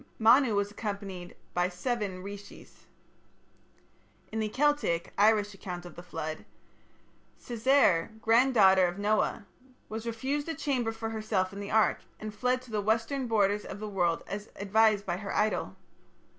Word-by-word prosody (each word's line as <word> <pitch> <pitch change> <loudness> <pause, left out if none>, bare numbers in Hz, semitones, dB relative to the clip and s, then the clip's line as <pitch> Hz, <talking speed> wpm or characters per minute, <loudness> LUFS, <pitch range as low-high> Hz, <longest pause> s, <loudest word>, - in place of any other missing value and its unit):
Manu 230 +1 +5
was 200 0 0
accompanied 200 -4 -6 0.2
by 175 +1 +1
seven 195 -1 -3
rishis. 200 +1 -11 1.4
In 220 - -2
the 215 -1 -1
Celtic 280 -10 +1
(Irish) 210 0 +3
account 180 -2 -7
of 175 - -10
the 175 - -8
flood, 155 -3 -5 1.0
Cessair, 235 -7 +3
granddaughter 225 -6 +5
of 175 +2 -5
Noah, 210 +1 0 0.4
was 220 +2 -5
refused 270 +7 -2
a 325 - -2
chamber 250 -6 -1
for 225 0 -5
herself 215 -4 -1
in 200 - -7
the 200 0 -6
ark, 220 -1 +3 0.2
and 215 -1 -6
fled 250 +4 0
to 250 - -14
the 210 -1 0
western 225 +5 0
borders 210 -2 +2
of 200 - -8
the 215 - -5
world 175 -5 0
as 205 +2 -6
advised 205 0 +3
by 175 -1 -2
her 200 +1 -5
idol. 215 0 0
210 Hz, 150 wpm, -29 LUFS, 195-225 Hz, 1.4 s, Manu